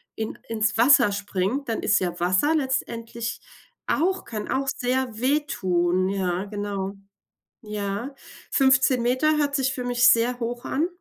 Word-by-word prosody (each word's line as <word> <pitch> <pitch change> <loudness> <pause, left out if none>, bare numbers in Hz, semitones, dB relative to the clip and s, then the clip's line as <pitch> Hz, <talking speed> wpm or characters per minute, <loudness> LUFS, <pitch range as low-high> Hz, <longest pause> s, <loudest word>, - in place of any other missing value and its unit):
in 220 0 -5
ins 220 -1 0
Wasser 245 -1 +6
springt, 200 +6 -2
dann 225 - -2
ist - - +3
ja 175 -2 -3
Wasser 185 - +2
letztendlich 235 -4 -3 0.4
auch 375 +4 0
kann 215 -2 -6
auch 275 +1 -1
sehr 250 -2 -1
wehtun. 185 -10 +1
Ja, 190 -1 -1
genau. 200 -1 -4 0.7
Ja. 210 +4 -4 0.4
15 265 -2 +4
Meter 260 +6 +2
hört 285 -1 0
sich 265 -1 +1
für 250 - -5
mich 245 -1 +3
sehr 245 +1 +3
hoch 240 0 -4
an. 310 +5 0
235 Hz, 140 wpm, -24 LUFS, 205-265 Hz, 0.7 s, Wasser